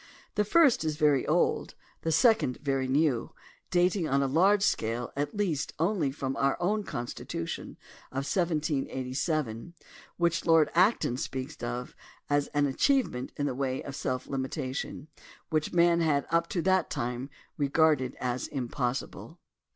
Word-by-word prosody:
The 210 - +2
first 275 - +4
is 155 -1 -1
very 145 -4 +3
old, - - +1 0.3
the 165 - -1
second 220 - +3
very 135 -2 0
new, 140 -2 +1 0.4
dating 180 -1 +2
on 140 +1 +2
a - - +1
large 190 +8 +4
scale 115 - -1
at 145 +6 -3
least 170 -8 -1
only 170 -3 +1
from 135 -1 -3
our 135 0 +1
own 210 +5 +1
Constitution 120 - -5 0.3
of 135 +1 -3
1787, 150 - -1 0.4
which 170 -1 +1
Lord 165 -2 +4
Acton 180 - +3
speaks 135 +3 -4
of 120 +1 -4 0.4
as 145 0 +2
an 145 -1 +1
achievement 140 - +1
in 145 - -1
the 140 - -1
way 130 0 -2
of 140 - -7
self 130 -2 -2
limitation 130 +1 -4 0.4
which 155 -1 0
men 170 0 +4
had 145 -4 +2
up 170 0 +2
to 170 - -1
that 190 0 +2
time 125 +3 -3 0.3
regarded 145 -2 +2
as 125 0 -2
impossible. 125 -1 -4
145 Hz, 145 wpm, -29 LUFS, 130-170 Hz, 0.4 s, first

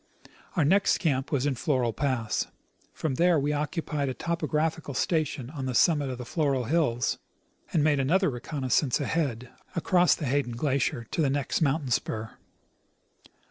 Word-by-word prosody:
Our 165 -5 +3
next 195 +6 +4
camp 135 -6 -1
was 140 -2 +1
in 145 -2 +1
Moral 125 -6 +2
pass. 130 -6 -1 0.4
From 155 -4 -2
there 175 -1 +5
we 145 +2 0
occupied 150 -1 -2
a 130 - -4
topographical 160 -3 -1
station 150 -6 -1
on 140 -4 -4
the 125 - -2
summit 145 0 +3
of 130 - -4
the 125 - -7
Floral 140 -3 0
hills, 125 -4 +1 0.5
and 155 - +2
made 145 -2 +3
another 180 +6 +2
reconnoissance 130 +1 0
ahead, 135 -5 -1 0.3
across 180 +1 +3
the 155 - -5
Hayden 130 -2 0
glacier,^ 125 -2 -1
to - - 0
the 145 - +3
next 140 +3 -1
mountain 140 -3 +1
spur. 110 -1 -1
145 Hz, 155 wpm, -27 LUFS, 130-160 Hz, 0.5 s, there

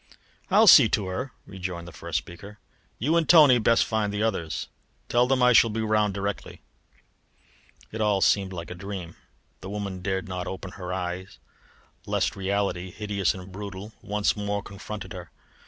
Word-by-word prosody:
"I'll 210 +3 +6
see 140 - +9
to 105 -2 0
her," 125 +9 -4
rejoined 90 -3 -6
the - - -9
first 85 -1 -4
speaker. 85 +6 -8 0.4
"You 150 +9 +1
and 160 -4 0
Tony 155 -6 +8
had 120 -3 +2
best 115 +2 +4
find 110 -2 -1
the 105 +1 -2
others. 95 -8 -2 0.4
Tell 120 +1 +3
them 130 -1 +2
I 125 0 +6
shall 115 - +6
be 110 +1 -2
round 105 -2 +1
directly." 100 +1 -5 1.3
It 110 - -4
all 105 -2 +2
seemed 95 0 +2
like 85 -2 -7
a - - -3
dream. 90 -2 -7 0.4
The 95 - -8
woman 100 -2 -5
dared 95 0 -2
not 90 -1 -4
open 95 -1 -6
her 90 -1 -7
eyes 90 0 -5 0.7
lest - - 0
reality 95 -2 -1
hideous 100 -2 -1
and 95 0 -10
brutal 100 +2 -8
once 105 0 0
more 100 -1 -3
confronted 105 +2 -8
her. 90 -3 -9
100 Hz, 170 wpm, -26 LUFS, 95-110 Hz, 1.3 s, see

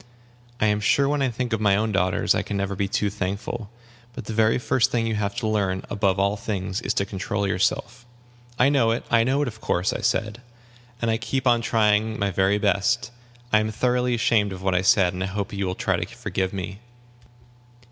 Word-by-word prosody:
I - - +2
am 105 -1 +2
sure 130 +5 +3
when 145 0 0
I 135 - +2
think 120 0 -3
of 110 - -1
my 100 -2 +4
own 110 +2 0
daughters 95 -2 +2
I - - 0
can 100 - -4
never 100 0 -2
be 100 +1 -1
too 100 +1 0
thankful. 100 +2 -4 0.4
But - - -8
the 110 - -5
very 110 0 +3
first 125 0 +1
thing 115 -2 0
you 115 - -1
have 105 0 -2
to 115 -2 -2
learn, 100 -3 0
above 100 -2 +1
all 100 +1 +1
things, 100 -1 -3
is - - -2
to 100 - +1
control 100 +1 -3
yourself." 125 +6 -1 0.5
"I 125 - +4
know 135 -6 +3
it 115 +1 -1
I 115 -1 +5
know 135 +4 +1
it, - - -2
of 110 -2 -8
course," 90 +2 0
I - - -4
said; 115 0 -1 0.6
"and 115 - +2
I 110 - +1
keep 130 +3 -3
on 120 -2 +4
trying 110 -1 +2
my 100 -1 0
very 95 +2 +2
best. 105 +5 +1 0.4
I 110 - +6
am 110 0 -1
thoroughly 125 +2 +1
ashamed 115 -4 +2
of 95 0 -8
what 95 -1 +1
I 90 - +2
said, 95 -1 +4
and 90 - -5
I - - -2
hope 100 +1 -4
you 100 -1 -2
will 90 - -2
try - - 0
to - - -2
forgive 95 -1 -3
me." 95 0 -6
105 Hz, 225 wpm, -24 LUFS, 100-115 Hz, 0.6 s, I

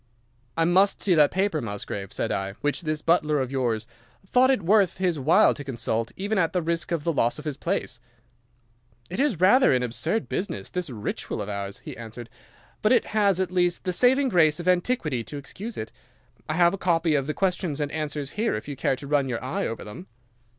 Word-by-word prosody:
"'I 165 - +3
must 190 +4 +3
see 190 - +2
that 150 -3 +5
paper, 190 -5 0
Musgrave,' 100 -3 -5
said - - -2
I, 95 0 -2
'which 145 - -2
this 155 -2 -3
butler 155 -3 +2
of 130 -1 -2
yours 120 -5 -1 0.4
thought 250 +6 +4
it 260 -8 +2
worth 195 0 +3
his 180 -4 0
while 145 +5 +5
to 145 - -8
consult, 115 -3 -2
even 200 +1 -1
at 165 -3 +1
the 180 - +1
risk 170 +1 -2
of 165 -3 -1
the 170 - 0
loss 120 -2 +1
of 150 - -9
his 150 -3 -3
place.' 170 -7 -3 1.1
"'It 185 - -4
is 270 - +1
rather 205 +9 +5
an 125 -1 +2
absurd 160 - -1
business, 200 - -4
this 180 -3 -3
ritual 110 -3 -4
of 105 0 -4
ours,' 100 -1 -5
he - - -7
answered. 115 0 -9 0.5
'But 215 - +4
it - - +3
has 200 -4 +3
at 185 -2 -1
least 175 -1 +1
the 185 -1 -1
saving 260 +6 +4
grace 160 -6 +3
of 175 - -5
antiquity 175 - +1
to 145 - -7
excuse 200 - -7
it. 110 - -5 0.6
I 155 - 0
have 175 +1 +4
a 195 - -4
copy 165 -2 +2
of 140 -2 0
the 150 - -2
questions 180 -5 -1
and 145 -1 -2
answers 150 -2 -4
here 220 +3 -1
if 105 - -6
you 145 - -5
care 135 - 0
to 140 - -8
run 140 -2 +1
your 120 -1 -3
eye 130 - -2
over 115 - -5
them. 105 -2 -10
155 Hz, 215 wpm, -25 LUFS, 130-185 Hz, 1.1 s, that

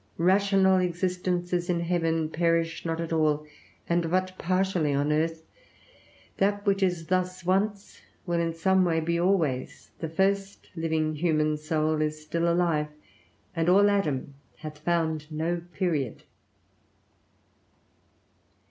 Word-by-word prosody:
Rational 190 +1 +4
existences 180 0 -1
in 170 -1 +1
heaven 165 -2 0
perish 165 0 0
not 165 0 -2
at 165 -1 -3
all, 150 -1 +1 0.4
and 170 -1 +1
but 185 +1 0
partially 185 -5 +1
on 145 +2 +1
earth; 160 +1 0 0.9
that 205 +1 +1
which 200 -1 +2
is 175 -3 0
thus 185 0 -1
once, 200 +2 -1 0.2
will 170 -2 0
in 165 0 0
some 190 +3 +2
way 165 -2 +2
be 170 +1 0
always; 170 -8 0
the 160 - -3
first 195 +3 -1
living 160 -2 0
human 155 -2 +1
soul 155 0 0
is 155 0 -1
still 170 +2 0
alive, 170 -3 +1 0.7
and 165 +1 +1
all 200 +2 +6
Adam 150 -9 -1 0.2
hath 155 -1 -9
found 160 -2 -1
no 165 +3 -1
period. 155 - -2
170 Hz, 125 wpm, -27 LUFS, 155-185 Hz, 0.9 s, all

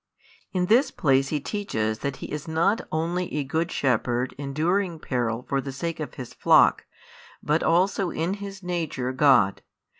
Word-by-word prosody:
In 180 -1 0
this 245 +8 +4
place 135 - +2
He 150 +1 -1
teaches 110 - -2
that 140 -1 -3
He - - -8
is 150 +1 -5
not 170 +7 +1
only 170 +3 -1
a 150 - 0
Good 160 +5 -1
Shepherd 125 -1 0
enduring 165 +6 0
peril 120 -5 -2
for 140 -1 0
the 135 - -6
sake 165 +5 -4
of 155 - -6
His 125 -4 -8
flock, - - +4 0.6
but 150 +2 +1
also 185 +2 +2
in 165 +4 -2
His 195 -1 -7
Nature 165 -8 -2
God. 130 -8 +4
155 Hz, 160 wpm, -25 LUFS, 135-180 Hz, 0.6 s, this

